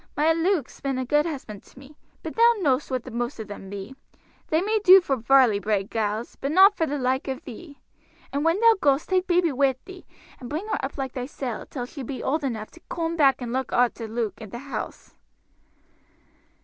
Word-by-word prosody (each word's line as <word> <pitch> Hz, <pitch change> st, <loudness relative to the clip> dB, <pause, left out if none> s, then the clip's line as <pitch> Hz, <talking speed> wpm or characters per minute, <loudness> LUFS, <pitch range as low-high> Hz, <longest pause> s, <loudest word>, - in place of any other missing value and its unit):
My 310 Hz, +2 st, +4 dB
Luke's 330 Hz, -3 st, -1 dB
been 270 Hz, -1 st, -2 dB
a 260 Hz, -, -2 dB
good 295 Hz, +5 st, +2 dB
husband 255 Hz, -10 st, -7 dB
to -, -, -22 dB
me. 275 Hz, +3 st, -14 dB, 0.3 s
But -, -, -6 dB
thou 470 Hz, +1 st, +5 dB
know'st 285 Hz, -7 st, +1 dB
what 255 Hz, -2 st, -2 dB
the -, -, -9 dB
most 240 Hz, 0 st, -3 dB
of 220 Hz, -, -6 dB
them 200 Hz, -2 st, -9 dB
be 200 Hz, +5 st, -7 dB, 0.5 s
they 315 Hz, -, +2 dB
may 430 Hz, +4 st, +1 dB
do 380 Hz, -1 st, +9 dB
for 285 Hz, -7 st, -1 dB
Varley 250 Hz, -3 st, +4 dB
bred 205 Hz, 0 st, -1 dB
gals, 220 Hz, +1 st, -2 dB
but 275 Hz, -, -1 dB
not 385 Hz, +5 st, +7 dB
for 325 Hz, -2 st, 0 dB
the 290 Hz, -, -2 dB
like 260 Hz, +1 st, -1 dB
of 265 Hz, -1 st, -4 dB
thee. 285 Hz, +4 st, -11 dB, 0.6 s
And 285 Hz, +1 st, -1 dB
when 330 Hz, +4 st, +2 dB
thou 460 Hz, 0 st, +7 dB
goest 280 Hz, +1 st, +2 dB
take 370 Hz, -1 st, +1 dB
baby 350 Hz, -2 st, +2 dB
wi' 270 Hz, -1 st, +2 dB
thee 375 Hz, -1 st, -12 dB, 0.3 s
and 245 Hz, -, -8 dB
bring 310 Hz, +8 st, -3 dB
her -, -, -2 dB
up 270 Hz, -, -4 dB
like 265 Hz, -2 st, -4 dB
thysel 250 Hz, -2 st, -5 dB
till 250 Hz, -4 st, -5 dB
she 275 Hz, +3 st, -9 dB
be 260 Hz, +1 st, -6 dB
old 300 Hz, +3 st, 0 dB
enough 225 Hz, -5 st, -4 dB
to 335 Hz, -, -16 dB
coom 335 Hz, 0 st, -2 dB
back 275 Hz, -5 st, +3 dB
and 240 Hz, 0 st, -4 dB
look 260 Hz, 0 st, -2 dB
arter 240 Hz, -2 st, +1 dB
Luke 220 Hz, -2 st, -3 dB
and 215 Hz, -3 st, -9 dB
the -, -, -6 dB
house." 275 Hz, +3 st, -7 dB
270 Hz, 215 wpm, -25 LUFS, 240-325 Hz, 0.6 s, do